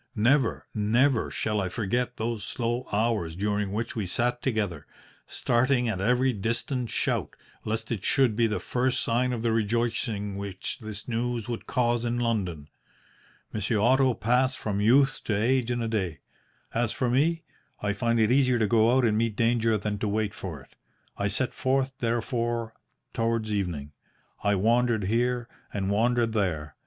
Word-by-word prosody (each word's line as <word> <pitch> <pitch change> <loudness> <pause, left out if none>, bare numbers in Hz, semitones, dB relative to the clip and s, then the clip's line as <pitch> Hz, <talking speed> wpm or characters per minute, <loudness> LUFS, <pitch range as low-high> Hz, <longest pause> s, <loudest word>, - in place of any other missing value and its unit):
Never, 120 +3 +2
never 115 +4 +2
shall 105 -1 -1
I 95 - -2
forget 120 +4 -1
those 110 -1 -2
slow 120 +1 -2
hours 105 -6 0
during 105 +1 -1
which 110 +3 -3
we 105 -5 -2
sat 120 +6 0
together, 100 - -2 0.4
starting 125 +1 +1
at 95 -5 -2
every 125 +4 +2
distant 120 +4 -2
shout, - - -1 0.3
lest 110 +1 -3
it 105 -5 -2
should 130 -6 +3
be 115 +1 +3
the 105 - -1
first 125 +1 0
sign 125 +2 +1
of 115 -2 -3
the 115 - +2
rejoicing 110 -2 -1
which 100 -2 -4
this 110 -2 -7
news 120 -1 -2
would 120 -2 -5
cause 120 -1 +1
in 120 0 -1
London. 95 -11 -1 0.9
Monsieur 110 +1 0
Otto 130 +3 +4
passed 125 +4 +1
from 100 -2 -2
youth 135 +5 +4
to 105 -2 0
age 125 +2 +2
in 120 -1 -1
a - - -1
day. 95 - -2 0.5
As 115 -1 0
for 125 - -1
me, 160 +7 +2 0.4
I 105 0 -1
find 115 +1 +1
it 110 +1 +3
easier 130 -2 +4
to 110 - +2
go 115 +3 +4
out 130 - +3
and 110 -2 +2
meet 115 -1 0
danger 115 -1 +2
than 105 0 -3
to 110 - -1
wait 105 0 -1
for 90 -6 -6
it. - - -23 0.4
I - - -1
set - - -1
forth, 135 0 0
therefore, 115 -1 -1 0.4
towards 115 -1 0
evening. 85 -8 -2 0.5
I 105 0 +3
wandered 115 +2 +2
here, 120 +4 0 0.2
and 100 -1 -2
wandered 115 +2 +2
there. 80 -8 -1
115 Hz, 170 wpm, -27 LUFS, 105-120 Hz, 0.9 s, Otto